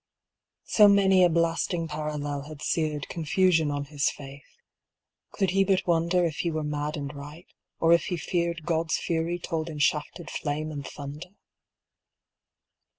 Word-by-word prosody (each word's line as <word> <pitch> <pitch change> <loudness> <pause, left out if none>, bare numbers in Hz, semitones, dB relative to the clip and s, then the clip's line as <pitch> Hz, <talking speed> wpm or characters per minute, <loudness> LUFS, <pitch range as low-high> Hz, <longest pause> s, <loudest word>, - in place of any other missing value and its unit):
So 210 -2 +6
many 195 -2 +5
a 175 - +6
blasting 165 +1 0
parallel 150 -2 -4
had 150 -1 -9
seared 155 -3 -1
Confusion 165 -1 +2
on 145 0 -2
his 145 0 0
faith, 140 -1 -11 0.7
could 195 -2 0
he 195 +1 +3
but 190 -1 +1
wonder 170 +1 +2
If 160 -3 -2
he 170 - 0
were 155 -1 -2
mad 150 +1 -3
and 140 0 -5
right, 145 +4 -10 0.3
or 165 0 +5
if 170 - +3
he 180 - -2
feared 170 0 -2
God's 165 -1 0
fury 170 +1 -1
told 165 -1 -3
in 155 - -7
shafted 150 +3 -1
flame 155 +1 -3
and 140 -3 -6
thunder? 145 +4 -8
160 Hz, 155 wpm, -27 LUFS, 150-170 Hz, 0.7 s, So